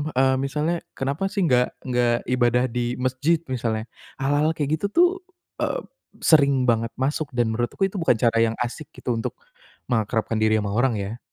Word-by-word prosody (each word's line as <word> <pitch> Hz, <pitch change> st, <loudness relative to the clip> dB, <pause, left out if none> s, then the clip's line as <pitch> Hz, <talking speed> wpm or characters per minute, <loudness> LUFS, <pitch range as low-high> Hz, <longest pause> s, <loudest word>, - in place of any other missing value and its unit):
eee, 130 Hz, 0 st, +4 dB
misalnya 150 Hz, +5 st, -1 dB, 0.2 s
kenapa 140 Hz, +8 st, -1 dB
sih 195 Hz, -1 st, -1 dB
enggak 125 Hz, -5 st, +2 dB
enggak 120 Hz, -2 st, +1 dB
ibadah 125 Hz, -1 st, +3 dB
di 120 Hz, 0 st, -1 dB
masjid, 130 Hz, +6 st, +1 dB
misalnya 110 Hz, -3 st, -1 dB, 0.3 s
hal-hal 145 Hz, +4 st, +1 dB
kayak 150 Hz, +1 st, 0 dB
gitu 200 Hz, -, +1 dB
tuh, 350 Hz, -, +5 dB, 0.5 s
eee, -, -, -1 dB, 0.4 s
sering 140 Hz, -5 st, +4 dB
banget 115 Hz, 0 st, +1 dB
masuk, 140 Hz, +2 st, -1 dB
dan 120 Hz, -2 st, +1 dB
menurutku 120 Hz, -, -3 dB
itu 195 Hz, -, -13 dB
bukan 165 Hz, -8 st, +3 dB
cara 115 Hz, -1 st, +2 dB
yang 115 Hz, -, +2 dB
asyik 125 Hz, +5 st, -4 dB
gitu 120 Hz, -, -1 dB
untuk 115 Hz, -, -2 dB, 0.6 s
mengakrabkan 115 Hz, -1 st, 0 dB
diri 110 Hz, 0 st, +3 dB
sama 100 Hz, -1 st, -3 dB
orang, 120 Hz, 0 st, +2 dB
ya. 100 Hz, +4 st, -5 dB
125 Hz, 170 wpm, -24 LUFS, 120-145 Hz, 0.6 s, tuh